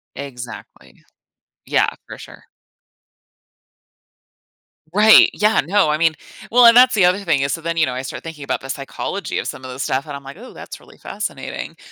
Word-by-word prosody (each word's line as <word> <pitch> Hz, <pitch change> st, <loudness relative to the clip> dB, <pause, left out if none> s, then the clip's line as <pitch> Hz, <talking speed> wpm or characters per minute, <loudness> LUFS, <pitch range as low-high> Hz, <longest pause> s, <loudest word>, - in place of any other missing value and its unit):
Exactly. 125 Hz, -4 st, -10 dB, 0.6 s
Yeah, -, -, +2 dB, 0.2 s
for -, -, -10 dB
sure. -, -, -14 dB, 2.5 s
Right. 215 Hz, +3 st, +7 dB
Yeah, 215 Hz, +1 st, +2 dB
no, 190 Hz, -1 st, +2 dB
I 150 Hz, -, +1 dB
mean 160 Hz, 0 st, +2 dB, 0.4 s
Well, 245 Hz, +1 st, +6 dB
and 235 Hz, 0 st, +8 dB
that's 250 Hz, +1 st, +6 dB
the 190 Hz, -4 st, +4 dB
other 180 Hz, +3 st, +2 dB
thing 165 Hz, -8 st, 0 dB
is, 140 Hz, -, -1 dB
so 165 Hz, -, -5 dB
then, 170 Hz, +1 st, -4 dB
you 160 Hz, -, +3 dB
know, 130 Hz, -, -4 dB
I 130 Hz, -, -4 dB
start 130 Hz, -, -8 dB
thinking 160 Hz, -3 st, -9 dB
about -, -, -3 dB
the 135 Hz, -, -10 dB
psychology 135 Hz, 0 st, -5 dB
of -, -, -5 dB
some -, -, -7 dB
of 130 Hz, -, -8 dB
those 130 Hz, +1 st, -5 dB
stuff 130 Hz, +3 st, -2 dB
and 145 Hz, -2 st, -7 dB
I'm 140 Hz, -, -10 dB
like, 140 Hz, +6 st, -11 dB
"Ooh, 250 Hz, +3 st, -12 dB
that's -, -, -10 dB
really -, -, -19 dB
fascinating." -, -, -6 dB
160 Hz, 190 wpm, -19 LUFS, 135-205 Hz, 2.5 s, and